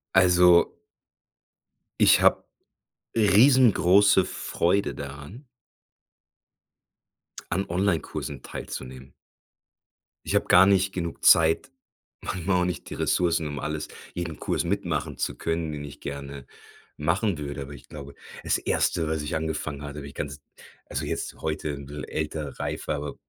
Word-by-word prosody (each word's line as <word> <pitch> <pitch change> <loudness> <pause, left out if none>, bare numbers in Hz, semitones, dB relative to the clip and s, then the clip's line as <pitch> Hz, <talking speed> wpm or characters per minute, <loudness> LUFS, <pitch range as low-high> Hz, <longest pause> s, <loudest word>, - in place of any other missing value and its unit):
Also 90 -2 +5 1.3
ich - - +6
habe - - +4 0.7
riesengroße 100 -4 +5
Freude 95 +4 -1
daran 70 - -9 2.0
an 95 +3 0
Onlinekursen 85 -7 -2
teilzunehmen. 65 0 -8 1.1
Ich - - -1
habe - - +2
gar 90 +2 +7
nicht 95 -1 +3
genug 85 -2 -4
Zeit, 85 +10 +5 0.5
manchmal 90 +1 -1
auch - - +2
nicht 90 - -4
die - - -6
Ressourcen, 85 -3 +1
um 75 -2 -5
alles 75 0 -4 0.2
jeden 85 -3 -5
Kurs - - -1
mitmachen - - -2
zu - - -2
können, 80 -1 -2
den 75 -1 -6
ich 70 - -10
gerne 70 -1 -7 0.5
machen 90 +4 0
würde, 70 -1 -5
aber 70 +1 -10
ich 65 - -14
glaube 70 -2 -9 0.3
das - - +1
Erste 80 -2 0
was 80 -1 -1
ich 75 - -3
angefangen 80 -2 -3
hatte, 70 0 -7
habe 70 - -8
ich 70 - -11
ganz 70 0 -6 0.5
also - - -3
jetzt, - - -4
heute, 75 -1 -2
‘n 70 -1 -8
bißchen 75 +1 -7
älter, 75 -2 -4
reifer - - -3
aber, 75 +1 -5
80 Hz, 135 wpm, -26 LUFS, 70-90 Hz, 2.0 s, gar